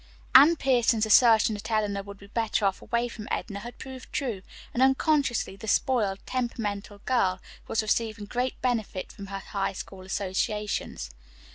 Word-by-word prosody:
Anne 290 +6 +9
Pierson's 240 -6 +2
assertion 220 0 +6
that 205 +2 -6
Eleanor 210 -3 0
would 200 0 -10
be 200 - -14
better 220 0 0
off 195 -1 0
away 235 0 0
from 220 -2 -8
Edna 200 -3 -3
had 240 +4 -9
proved 260 -1 -9
true, 235 -9 -2 0.3
and 245 - 0
unconsciously 265 -4 +2
the 220 +3 -10
spoiled, 215 -4 +2
temperamental 210 -5 -3
girl 190 -8 +2 0.3
was 225 - 0
receiving 215 -1 -1
great 250 +4 -2
benefit 225 -7 -1
from 200 - -9
her 195 0 -5
High 195 0 -3
School 190 0 -8
associations. 195 - -2
220 Hz, 155 wpm, -27 LUFS, 200-245 Hz, 0.3 s, Anne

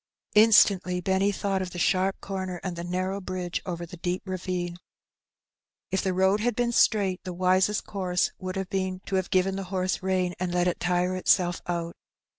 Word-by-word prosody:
Instantly 200 -4 +5
Benny 190 +2 +1
thought 195 -1 -1
of 185 - -3
the 180 - -9
sharp 190 +2 +1
comer 185 -2 -4
and 185 -2 -3
the 170 - -5
narrow 185 +3 -2
bridge 185 -2 -3
over 170 -1 -4
the 175 +1 -11
deep 180 +2 -2
ravine. 180 -2 -3 1.1
If 190 - +1
the 190 - 0
road 190 +2 +3
had 235 +1 0
been 240 0 +1
straight, 200 -5 +2
the 180 - -5
wisest 185 +3 +2
course 180 -3 0
would 185 0 -5
have 190 -1 -4
been 185 -1 -2
to 195 - -1
have 185 -1 -2
given 190 +1 +1
the 195 - -4
horse 185 0 -1
rein, 185 -1 0
and 180 -1 -2
let 175 0 +1
it 180 - -1
tire 180 +1 +1
itself 180 -1 +2
out. 170 -1 -2
185 Hz, 190 wpm, -27 LUFS, 180-190 Hz, 1.1 s, Instantly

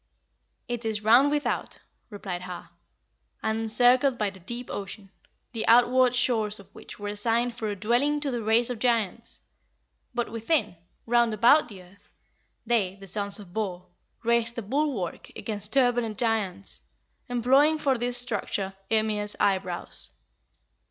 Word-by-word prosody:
"It 240 -1 -3
is 215 -2 -2
round 240 +6 +6
without," 295 0 -2 0.3
replied 195 -4 -6
Har, 180 -1 -8 0.7
"and 220 0 0
encircled 245 +4 +3
by 210 -3 -1
the 190 - -14
deep 240 +7 -6
ocean, 195 0 -7 0.4
the 225 -2 -3
outward 250 +2 +5
shores 220 -4 +1
of 200 - -16
which - - -11
were 205 0 -5
assigned 230 +4 0
for 230 -2 -4
a 205 - -2
dwelling 240 +9 +1
to 285 -2 -1
the 240 -2 -2
race 225 +3 +3
of 240 - -5
giants. 230 -2 -1 0.7
But 240 -3 -2
within, 230 - 0 0.3
round 235 -1 +2
about 245 +8 +5
the 195 -5 -11
earth, 185 +3 -22 0.5
they 215 -5 +1
(the 195 0 -12
sons 200 +1 -1
of 195 -4 -13
Bor) 185 -5 -4 0.3
raised 235 0 +2
a 235 - -3
bulwark 255 - -2
against 210 -2 -4
turbulent 245 -5 +2
giants, 195 - -2 0.5
employing 265 +6 +3
for 270 -5 0
this 245 +1 +1
structure 210 -5 -1 0.2
Ymir's 215 -2 0
eyebrows. 185 -3 -1
225 Hz, 145 wpm, -26 LUFS, 205-245 Hz, 0.7 s, round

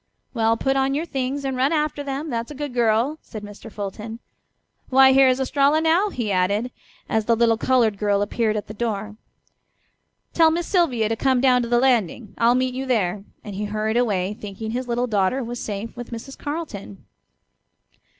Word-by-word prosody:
"Well, 225 -2 +2
put 270 +3 0
on 270 0 +1
your 310 +3 -1
things 275 -1 -3
and 265 -1 -1
run 260 +3 +2
after 300 -2 0
them, 285 +2 -4
that's 230 0 -3
a 300 - -8
good 290 -2 -5
girl," 240 +5 +1
said 215 -3 -9
Mr. 205 +2 -10
Fulton. 210 +3 -6 0.7
"Why, 265 0 +7
here 270 0 +6
is 255 0 +2
Estralla 280 +3 +2
now," 330 +6 +2
he 235 - -3
added, 200 +6 +1 0.4
as 220 -1 0
the 230 - +3
little 230 0 +3
colored 225 -4 +2
girl 205 -1 +2
appeared 215 +1 0
at 210 - -4
the 215 - -9
door. 215 -1 -3 1.2
"Tell 325 -1 +5
Miss 340 +2 -1
Sylvia 285 - +1
to 225 - -1
come 260 +2 +2
down 250 -1 +4
to 235 - -3
the 240 - +3
landing; 235 -4 +1
I'll 235 +1 +4
meet 255 0 0
you 265 +1 -4
there," 200 -5 0 0.2
and 205 - -7
he 205 +2 -3
hurried 215 +1 -2
away, 205 -5 +1
thinking 210 +1 -7
his 250 +2 -3
little 240 +1 0
daughter 215 +3 0
was 240 +1 -5
safe 210 +2 -5
with 240 -1 -8
Mrs. 235 +3 -8
Carleton. 290 - -6
240 Hz, 190 wpm, -23 LUFS, 215-270 Hz, 1.2 s, Why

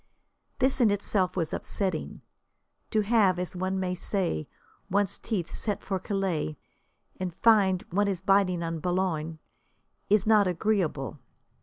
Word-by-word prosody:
This 260 0 +2
in 230 - +6
itself 195 -2 0
was 165 -3 -1
upsetting. 185 -6 -3 0.7
To 215 - +2
have, 205 -4 +3
as 180 0 -4
one 185 +1 -1
may 185 -1 -1
say, 180 - -1 0.4
one's 200 0 0
teeth 190 -7 -3
set 210 -3 -2
for 190 -1 -2
Calais, 185 - -2 0.6
and 180 -2 -3
find 195 -5 +4
one 205 +3 +2
is 195 -3 -1
biting 190 -2 +2
on 165 -1 -3
Boulogne, 165 -2 -1 0.7
is 205 -1 +4
not 215 -2 +5
agreeable. 175 -7 -1
190 Hz, 135 wpm, -28 LUFS, 175-205 Hz, 0.7 s, in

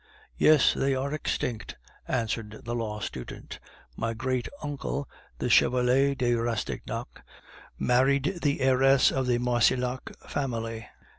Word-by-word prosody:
"Yes, 155 -3 +6
they 135 0 +1
are 135 +2 -2
extinct," 125 -6 -3 0.3
answered 115 -3 -2
the 120 - -3
law 110 -3 -3
student. 65 -9 -7 0.4
"My 115 +1 -2
great 130 +1 -1 0.2
uncle, 140 -1 -3 0.3
the - - -2
Chevalier 130 +3 +4
de 125 -2 +1
Rastignac, 115 - -3 0.6
married 140 +8 +2
the 145 -1 0
heiress 130 +1 +4
of 130 -1 -1
the 120 -1 +2
Marcillac 125 +1 +1 0.2
family. 115 -5 -3
125 Hz, 120 wpm, -27 LUFS, 115-135 Hz, 0.6 s, Yes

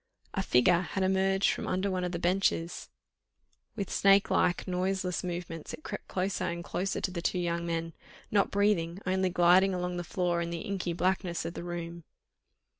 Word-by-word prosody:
A 195 - 0
figure 170 +2 +4
had 190 +1 -2
emerged 190 +1 +2
from - - -4
under 190 +2 0
one 185 -1 -1
of 180 - -2
the 175 - -2
benches; 175 -1 0 0.9
with 200 - -4
snake 195 0 +4
like, 175 - +2
noiseless 185 0 -1
movements 175 -3 -5
it 310 - -22
crept - - -6
closer 190 +1 -1
and 170 0 -3
closer 190 +3 -2
to 185 - -2
the 175 -2 -4
two 180 - 0
young 170 -1 -1
men, 165 0 -2 0.4
not 200 -1 +3
breathing, 200 -4 +1
only 185 0 +1
gliding 180 +2 +4
along 180 0 -2
the 175 - -3
floor, 175 0 0
in 170 - -2
the 170 -1 -4
inky 190 -3 -2
blackness 180 0 0
of 170 - -4
the - - -6
room. 170 -1 -6
180 Hz, 185 wpm, -30 LUFS, 170-190 Hz, 0.9 s, figure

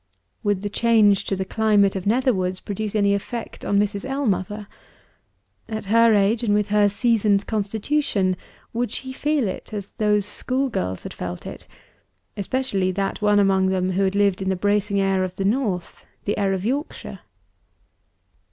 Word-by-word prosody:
Would 205 -3 0
the 205 - -2
change 210 -3 +4
to 195 - -1
the 190 0 -3
climate 205 -1 +2
of 190 0 -3
Netherwoods 200 -6 +1
produce 210 +1 -4
any 200 -1 +3
effect 225 +4 -5
on 200 - +1
Mrs. 205 0 0
Ellmother? 215 -7 -2 1.0
At 220 -1 -4
her 230 -1 +6
age, 205 +3 +2
and 205 -3 +2
with 210 0 0
her 205 0 +4
seasoned 205 -2 +2
constitution, 210 -1 0 0.4
would 240 0 -1
she 260 +4 -6
feel 295 -3 0
it 185 - -6
as 200 -1 -6
those 210 -2 +2
school 260 +5 -1
girls 90 - -3
had - - -7
felt 90 0 -6
it - - -9 0.7
especially 200 -3 -1
that 195 +2 -2
one 210 0 +4
among 195 -2 +3
them, 185 0 0
who 190 +1 +2
lived 200 -1 +1
in 190 - -1
the 190 - +1
bracing 205 +1 +1
air 195 -1 +2
of 185 0 -4
the 195 - -2
North, 205 -5 -1 0.2
the 205 - -1
air 200 -1 +1
of 190 0 -2
Yorkshire? 280 +6 -3
205 Hz, 165 wpm, -23 LUFS, 195-220 Hz, 1.0 s, her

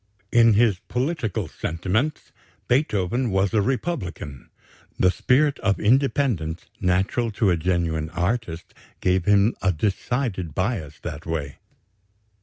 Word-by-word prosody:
"In 115 -1 +6
his 105 -4 +3
political 125 - -2
sentiments 100 - -2 0.4
Beethoven 120 - +1
was 95 +1 +1
a 110 - +3
republican; 100 - -3 0.5
the 90 - +4
spirit 140 +6 +2
of 100 -2 +1
independence 115 - +1
natural 95 +6 +1
to 105 -3 +2
a - - +3
genuine 80 -2 -1
artist 90 0 -3 0.3
gave 90 -1 +1
him 105 +2 +4
a 95 - +3
decided 95 - -2
bias 90 - -2
that 80 -1 -7
way. 75 -4 -4
100 Hz, 115 wpm, -24 LUFS, 85-120 Hz, 0.5 s, In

